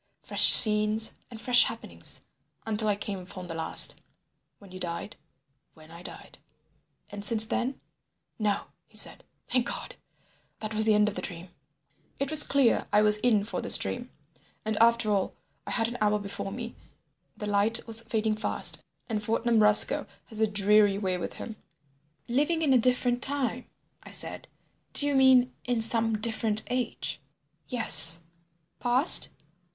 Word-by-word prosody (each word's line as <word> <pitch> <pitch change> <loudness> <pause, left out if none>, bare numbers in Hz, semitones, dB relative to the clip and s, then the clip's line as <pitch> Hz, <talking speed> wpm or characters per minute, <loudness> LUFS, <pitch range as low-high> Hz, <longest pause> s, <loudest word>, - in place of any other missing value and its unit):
Fresh - - +4
scenes 215 0 +6 0.2
and 230 - -12
fresh 245 +2 +4
happenings—until 215 -1 -5
I 205 - 0
came 205 -1 -7
upon 185 0 -11
the 170 - -9
last—" 160 0 +2 0.6
"When 200 -2 -18
you 185 - -11
died?" 175 +3 -6 0.6
"When 155 0 -19
I 170 +1 -13
died." - - -11 0.7
"And 205 0 -9
since 220 +1 +3
then—" 255 +4 -4 0.6
"No," 210 -2 -2 0.3
he - - -14
said. - - -1 0.2
"Thank 250 -2 -2
God! - - -8 0.6
That 215 0 -7
was 220 0 -1
the 215 -1 +2
end 210 0 +1
of 210 - -4
the - - -6
dream.. 175 -1 -9 0.4
." - - -41
It 275 +1 -4
was 310 -1 +4
clear 275 -4 0
I 210 +1 +2
was 210 0 +3
in 215 -2 0
for 210 - -6
this - - +4
dream. - - -6 0.6
And 220 0 -3
after 230 -1 +1
all, 195 -2 -3 0.3
I - - -6
had 225 -2 -1
an 240 +1 -8
hour 210 0 0
before 200 -1 -8
me, 230 +2 -8 0.6
the 210 - -7
light 205 +3 0
was 225 0 -1
fading 220 -1 -3
fast, 215 - 0 0.2
and 215 -3 -5
Fortnum 225 +1 -1
Roscoe 210 0 +2 0.2
has 220 -2 -7
a 220 - +2
dreary 205 0 +2
way 185 -3 -4
with 170 - -7
him. 220 -2 -10 0.7
"Living 300 +7 -1
in 280 -4 +1
a 255 - +3
different 245 0 +1
time," 265 -3 -1 0.3
I - - -15
said: - - -3 0.5
"do 285 - +2
you 290 - -1
mean 260 -2 +3
in 245 -1 -2
some 225 0 0
different 220 -1 +1
age?" 250 -1 -5 0.5
"Yes." 165 - +7 0.6
"Past?" 250 +6 +4
220 Hz, 160 wpm, -26 LUFS, 205-245 Hz, 0.7 s, Yes